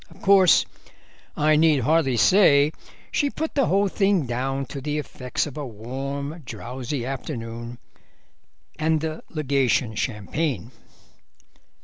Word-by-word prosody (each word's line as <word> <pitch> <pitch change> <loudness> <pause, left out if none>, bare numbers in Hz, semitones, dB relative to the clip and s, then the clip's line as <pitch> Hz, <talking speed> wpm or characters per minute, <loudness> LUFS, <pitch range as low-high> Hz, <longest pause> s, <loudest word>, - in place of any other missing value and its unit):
Of - - -17
course 190 -3 +6 0.7
I 155 +1 +4
need 155 -3 +4
hardly 135 -1 +2
say 150 - +5 0.4
she 285 - +1
put 315 +3 -4
the 275 -3 +2
whole 200 +2 +3
thing 195 -4 +1
down 135 +3 -2
to 140 +1 -7
the 150 +2 -2
effects 130 -4 -3
of 150 -1 -8
a 150 - -4
warm, 135 +7 -5
drowsy 125 +1 -5
afternoon 120 -3 -6 1.0
and 160 0 +2
the 160 0 -4
Legation 135 -6 +1
champagne. 120 - -3
140 Hz, 120 wpm, -24 LUFS, 125-160 Hz, 1.0 s, course